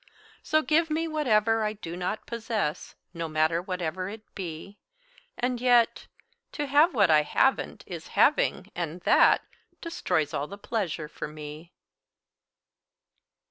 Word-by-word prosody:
So, 310 0 +1
give 325 +2 +2
me 320 +2 0
whatever 225 -8 +2
I 210 0 -1
do 175 -5 -7
not 180 +4 -3
possess, 225 -8 -3 0.2
No 165 -1 -4
matter 155 +2 +1
whatever 185 0 -3
it 215 +1 -9
be; 185 +1 -7 0.6
And 245 -1 -1
yet 245 -2 +3 0.5
To 295 - -2
have 290 +3 +4
what 200 -7 +4
I 155 -1 +6
haven't 265 - +1
is - - -8
having, - - +3
and 170 0 -4
that - - +5 0.4
Destroys 160 - -1
all 145 0 -2
the 200 - -9
pleasure 190 -8 -3
for 150 - -6
me. 150 +2 -9
200 Hz, 135 wpm, -27 LUFS, 165-245 Hz, 0.6 s, I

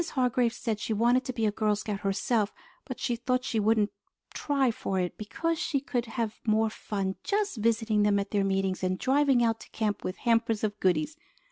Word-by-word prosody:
Hargrave 250 -2 +2
said 225 -2 -3
she 220 - -2
wanted 240 +4 +3
to 260 - -2
be 230 -3 -1
a 210 - +2
Girl 210 0 +1
Scout 205 -1 -4
herself, 205 +2 0 0.3
but - - -6
she 245 - 0
thought 250 +2 0
she 230 -3 -1
wouldn't 215 0 +2 0.4
try 275 -4 +1
for 195 -3 -2
it 180 -1 -2
because 330 +10 -2
she 280 - 0
could 245 -3 -2
have 225 -2 -3
more 220 0 +2
fun 195 -3 -3
just 410 - 0
visiting 220 -1 +2
them 205 -1 +3
at 200 0 -2
their 205 -2 +2
meetings 195 -1 0
and 185 0 0
driving 270 -1 +3
out 225 -1 +1
to - - -13
camp 215 -2 -2
with 185 - -4
hampers 230 -2 +1
of 210 -1 -1
goodies. 300 - +1
225 Hz, 205 wpm, -28 LUFS, 205-250 Hz, 0.4 s, wanted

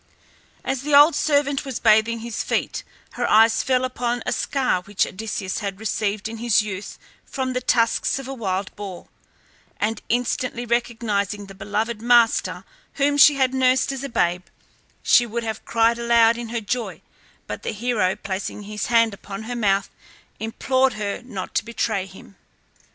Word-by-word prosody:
As 265 -1 -1
the 290 +1 +1
old 295 +3 +8
servant 285 -2 +1
was 270 -4 -4
bathing 220 +1 +3
his 230 -1 -4
feet - - -2 0.3
her - - -2
eyes 225 +1 +5
fell 255 +1 +1
upon 245 -2 -2
a - - -1
scar 260 -9 0
which 200 +1 0
Odysseus 210 -1 -4
had 200 -2 -5
received 215 -1 -2
in 225 +1 -7
his 225 -2 +2
youth 205 -1 -6 0.3
from 260 -1 -3
the 250 - -1
tusks 230 0 +1
of 270 -1 -7
a 270 - -5
wild 195 -5 -3
boar; 195 -3 -8 0.7
and 215 +1 -1
instantly 245 0 -1
recognizing 215 -4 -1
the 195 - -12
beloved 210 +3 -3
master 235 -1 +3 0.3
whom 285 +1 +1
she 290 0 +7
had 260 -1 +1
nursed 260 0 +2
as 270 0 -5
a 275 - -4
babe, 180 -5 0 0.6
she 240 - +5
would 235 +1 -3
have 220 -1 -4
cried 230 +1 +2
aloud 235 -1 +4
in 235 -1 -6
her 235 0 -3
joy, 230 +3 -4 0.4
but - - -6
the - - -4
hero 215 -4 0
placing 200 +1 -5
his 210 0 -4
hand 230 -2 +3
upon 200 +1 -8
her 245 +2 -5
mouth, 200 -4 +1 0.5
implored 260 +4 +1
her 210 0 -4
not 200 -7 -7
to - - +1
betray 220 -4 -2
him. 190 +1 -15
230 Hz, 165 wpm, -22 LUFS, 205-250 Hz, 0.7 s, old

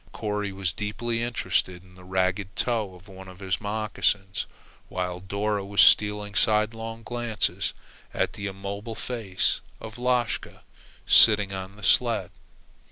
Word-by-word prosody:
Corry 105 -2 -2
was 95 -2 -2
deeply 115 +3 -2
interested 95 -6 -1
in 90 -1 -19
the 90 0 -15
ragged 95 +1 -1
toe 110 -6 0
of 90 +2 -17
one 95 -1 -11
of 95 -1 -12
his 95 -1 -2
moccasins, 105 -2 0 0.4
while 90 -1 -3
Dora 100 +2 -1
was 100 +1 -4
stealing 105 -1 +5
sidelong 115 +2 +1
glances 120 -2 -1 0.4
at - - 0
the 105 - -5
immobile 100 +3 -5
face 110 -8 -1 0.2
of 110 +1 -9
Lashka 125 -1 -1 0.4
sitting 105 -3 +6
on 95 +1 -6
the 105 - -15
sled. - - +3
105 Hz, 135 wpm, -26 LUFS, 95-110 Hz, 0.4 s, sitting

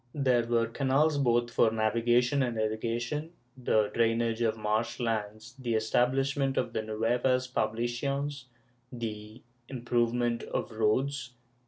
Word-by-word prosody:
There 125 -5 +2
were 115 -1 +2
canals, 140 +5 +1
both 120 -2 +2
for 115 - +4
navigation 120 +4 +2
and 120 -3 -1
irrigation, 120 +8 -2 0.2
the 110 -4 +1
drainage 115 0 +1
of 110 -1 +1
marsh 110 +3 -1
lands, 110 0 -3
the 120 -3 -1
establishment 135 +5 +1
of 125 -2 -1
the - - -1
nuevas 120 +4 0
pohlaciones, 130 +4 -2 0.5
the 110 -1 -7 0.3
improvement 120 -1 0
of - - -4
roads. 125 +5 0
120 Hz, 120 wpm, -29 LUFS, 115-130 Hz, 0.5 s, for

